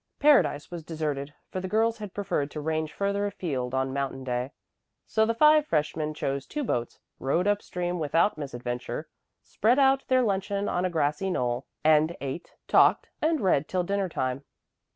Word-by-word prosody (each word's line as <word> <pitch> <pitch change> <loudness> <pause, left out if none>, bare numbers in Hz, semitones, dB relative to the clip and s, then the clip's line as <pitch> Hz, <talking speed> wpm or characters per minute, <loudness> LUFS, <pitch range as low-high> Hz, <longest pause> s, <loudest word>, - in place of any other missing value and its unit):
Paradise 280 - +3
was 170 -2 -6
deserted, 150 -3 -3 0.2
for 185 - -3
the 185 - -4
girls 225 +3 +1
had 210 -2 -6
preferred 160 -8 -1
to 150 - -6
range 155 0 -2
further 200 0 -1
afield 135 -11 -3
on 130 0 0
Mountain 135 -1 -3
Day. 125 +1 -2 0.5
So 220 0 +2
the 230 - 0
five 300 +3 +5
freshmen 155 0 -1
chose 135 -2 -3
two 300 -1 -3
boats, 120 - -2 0.2
rowed 165 +7 +1
up 205 0 +2
stream 175 0 -3
without 165 +6 +2
misadventure, 125 -4 -5 0.4
spread 235 +5 +2
out 270 -1 +4
their 255 -1 +4
luncheon 200 -1 -1
on 180 +1 0
a - - +1
grassy 155 +2 0
knoll, 125 -6 -1 0.2
and 155 +2 +4
ate, 140 +5 -6
talked, - - +4
and 315 -1 +1
read 165 -7 +2
till 185 -1 0
dinner 195 +1 -1
time. 130 -2 -2
165 Hz, 175 wpm, -27 LUFS, 140-205 Hz, 0.5 s, five